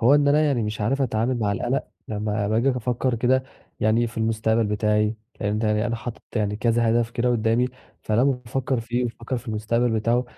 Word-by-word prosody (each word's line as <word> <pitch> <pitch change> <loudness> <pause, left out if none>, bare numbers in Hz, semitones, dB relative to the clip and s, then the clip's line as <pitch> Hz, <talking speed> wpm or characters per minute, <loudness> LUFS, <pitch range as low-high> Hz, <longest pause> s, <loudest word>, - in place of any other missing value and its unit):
هو 125 +5 +6
إن 145 -1 +4
أنا 145 +2 +4
يعني 140 -6 +2
مش 105 +1 -3
عارف 135 +7 +1
أتعامل 120 0 0
مع 105 -3 +1
القلق، 120 +6 -1 0.2
لمّا 105 -1 -1
باجي 115 +5 +2
أفكر 125 0 -1
كده، 130 +3 +2 0.4
يعني 110 +2 +3
في 115 - -7
المستقبل 110 0 +1
بتاعي، 105 +1 +1 0.2
فهمت 105 +2 0
يعني 105 +1 +1
أنا 115 -1 -1
حاطط 120 0 -7
يعني 105 -1 0
كذا 115 +1 +2
هدف 115 0 +1
كده 120 +1 0
قُدامي، 115 +1 +2 0.3
فلمّا 110 +2 +2 0.2
بافكر 130 +1 -1
فيه 120 +2 -1
وأفكر 120 +1 -4
في 120 - -11
المُستقبل 115 +3 0
بتاعُه، 115 +3 +1
115 Hz, 190 wpm, -24 LUFS, 110-125 Hz, 0.4 s, هو